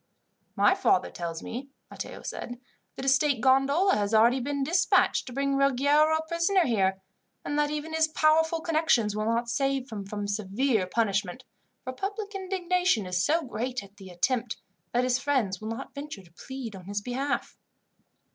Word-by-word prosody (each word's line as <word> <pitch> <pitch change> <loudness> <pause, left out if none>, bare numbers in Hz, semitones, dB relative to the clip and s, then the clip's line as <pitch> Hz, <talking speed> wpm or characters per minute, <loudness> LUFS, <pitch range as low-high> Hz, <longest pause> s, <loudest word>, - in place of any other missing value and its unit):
"My - - +5
father 90 - +1
tells 170 -1 -5
me," 260 +4 -6 0.2
Matteo - - -7
said, 245 0 -6 0.4
"that 265 - -6
a - - -3
state 275 -1 +3
gondola 275 - +3
has 205 +1 0
already 235 +4 +5
been 280 +2 -2
dispatched 335 0 +2
to - - -6
bring 275 +2 0
Ruggiero 285 +3 +3
a 320 - -5
prisoner 340 +2 +2
here, 195 -5 +1 0.5
and 290 - -2
that 295 0 +2
even 300 +1 -4
his 320 0 +3
powerful 320 +1 +2
connections 310 -11 +2
will 215 0 -1
not 230 +1 0
save 270 +1 -1
him 205 -2 -5
from 205 0 -4
severe 205 +1 0
punishment, 205 +2 -1 0.4
for 255 - -5
public 405 - -5
indignation 365 - 0
is 180 0 0
so 325 +3 +2
great 250 -1 -4
at 200 +1 -17
the 190 -2 -11
attempt, 230 +6 -1 0.3
that 245 +1 +1
his 255 0 +1
friends 245 -10 0
will 215 - -6
not 230 +4 -6
venture 280 -8 -7
to 170 -2 -21
plead 250 +1 -7
on 185 -2 -11
his 200 +1 -3
behalf." 265 +5 -3
260 Hz, 175 wpm, -27 LUFS, 215-300 Hz, 0.5 s, My